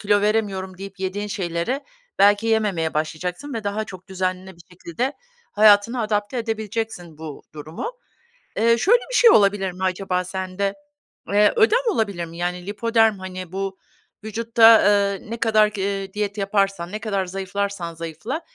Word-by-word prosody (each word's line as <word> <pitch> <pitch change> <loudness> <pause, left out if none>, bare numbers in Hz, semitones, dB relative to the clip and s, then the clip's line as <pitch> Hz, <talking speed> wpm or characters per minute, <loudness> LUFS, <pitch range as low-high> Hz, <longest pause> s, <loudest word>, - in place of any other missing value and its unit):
kilo 205 0 +2
veremiyorum." 200 -3 -1
deyip 195 0 -9
yediğin 195 +2 -3
şeylere 195 - -3 0.3
belki 205 +2 +5
yememeye 205 -8 0
başlayacaksın 175 - -3
ve 225 - -4
daha 205 +2 -2
çok 185 -2 -12
düzenli 185 0 -3
bir 170 - -16
şekilde 180 - -3 0.4
hayatına 215 +3 +5
adapte 210 +2 -1
edebileceksin 220 -7 -4
bu 155 -3 -8
durumu. 155 - -6 0.7
Eee, 230 +1 +4
şöyle 465 - +4
bir - - -3
şey 470 - +7
olabilir 200 - +4
mi 185 +1 -8
acaba 185 0 -1
sende? 190 +2 -3 0.6
Eee, 210 +1 +5
ödem 450 +2 +4
olabilir 200 - -1
mi, 165 0 -11
yani, 180 +1 -3
lipödem 225 0 +2
hani, 185 -2 -7
bu 195 0 -4 0.5
vücutta, 225 +1 +5
eee, 200 0 +2
ne 230 - -3
kadar, 215 -2 +4
g 210 -2 -6
eee, 195 -1 -3
diyet 210 0 -3
yaparsan, 195 -3 0
ne 215 - -4
kadar 200 -4 -1
zayıflarsan 195 -1 -4
zayıfla, 170 - -5
200 Hz, 150 wpm, -22 LUFS, 185-220 Hz, 0.7 s, şey